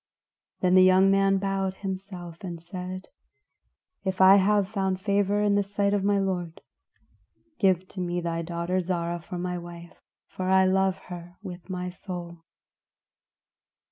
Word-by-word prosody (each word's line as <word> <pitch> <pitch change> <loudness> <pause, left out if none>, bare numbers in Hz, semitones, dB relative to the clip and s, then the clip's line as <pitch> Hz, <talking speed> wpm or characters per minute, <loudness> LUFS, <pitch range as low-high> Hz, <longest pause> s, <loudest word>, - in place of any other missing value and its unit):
Then 180 -1 +3
the 185 - +8
young 185 +1 +6
man 195 0 +3
bowed 195 -1 -1
himself 190 -3 -6
and 175 -3 -5
said, 185 +2 -7 0.9
"If 190 -1 -2
I 190 +1 +8
have 200 0 +3
found 190 -2 -1
favor 200 +1 +1
in 205 -1 +3
the 205 - +3
sight 200 0 0
of 200 -2 +1
my 200 0 +3
lord, 180 -4 -2 1.0
give 185 -2 +2
to 185 - -6
me 175 0 -1
thy 170 -1 -2
daughter 170 +2 -2
Zarah 170 -1 -2
for 175 +2 -7
my 180 0 -3
wife; 170 0 -11 0.3
for 185 0 -4
I 190 0 +5
love 190 0 +2 0.2
her 175 0 -10
with 180 -1 -9
my 180 -1 -4
soul." 175 -1 -7
185 Hz, 150 wpm, -26 LUFS, 175-195 Hz, 1.0 s, the